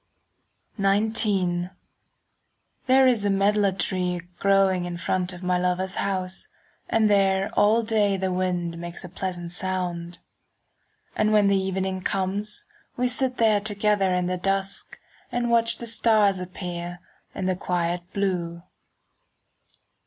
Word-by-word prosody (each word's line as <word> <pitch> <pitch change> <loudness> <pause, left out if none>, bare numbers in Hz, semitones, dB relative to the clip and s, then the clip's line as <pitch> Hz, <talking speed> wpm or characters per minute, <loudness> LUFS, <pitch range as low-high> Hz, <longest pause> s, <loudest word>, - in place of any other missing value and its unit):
XIX 195 -3 +1 1.2
There 265 +1 +6
is 240 -5 +3
a 205 - +1
medlar 200 +1 +3
tree 180 -1 -1 0.2
Growing 195 -2 +3
in 175 -1 -4
front 180 +1 -1
of 180 0 -9
my 180 0 +1
lover's 180 +1 0
house, 190 - -2 0.4
And 225 -1 +3
there 195 -1 +3
all 215 +3 +4
day 210 -3 +2
The 190 0 -1
wind 180 -2 -1
makes 170 +1 -7
a 180 - -8
pleasant 175 -1 -5
sound. 180 -2 -3 1.0
And 215 0 +2
when 210 -2 +4
the 200 - +3
evening 190 0 -2
comes, 200 +3 -2 0.3
5 - - -38
We 250 +1 +2
sit 255 0 0
there 220 -2 +4
together 205 -2 +1
in 180 0 +1
the 180 +1 -1
dusk, 195 +1 -2 0.3
And 240 -1 -1
watch 230 0 +3
the 235 - -7
stars 215 -4 +3
Appear 175 -1 -6 0.4
in 190 - -3
the 185 0 +1
quiet 175 -1 -1
blue. 175 -4 -2
190 Hz, 135 wpm, -25 LUFS, 180-205 Hz, 1.2 s, There